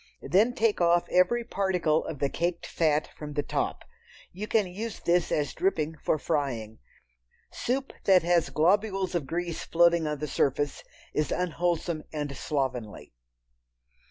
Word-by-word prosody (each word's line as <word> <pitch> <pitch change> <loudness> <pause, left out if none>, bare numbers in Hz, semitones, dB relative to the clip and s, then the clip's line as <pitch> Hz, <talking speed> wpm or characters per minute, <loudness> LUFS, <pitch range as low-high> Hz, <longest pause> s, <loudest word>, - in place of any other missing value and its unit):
Then 220 +7 +3
take 225 -6 +1
off 170 0 +3
every 210 +7 +3
particle 185 -8 +1
of 160 - -5
the 140 - +1
caked 170 +4 -2
fat 155 -2 +1
from 150 -1 -7
the 145 0 -1
top. - - -2 0.5
You 205 +4 -5
can 215 -3 +2
use 205 +5 -6
this 175 0 +1
as 145 -2 0
dripping 160 -4 0
for - - +2
frying. 130 -9 -2 0.7
Soup 265 +2 -2
that 185 -3 +6
has 175 -1 +2
globules 195 +3 +1
of 165 -6 -1
grease 170 0 -3
floating 170 -1 +3
on 150 0 -2
the 150 +2 -4
surface 145 0 0 0.3
is 150 - 0
unwholesome 170 -2 -1
and 145 -2 -4
slovenly. 125 - -3
170 Hz, 145 wpm, -28 LUFS, 150-185 Hz, 0.7 s, that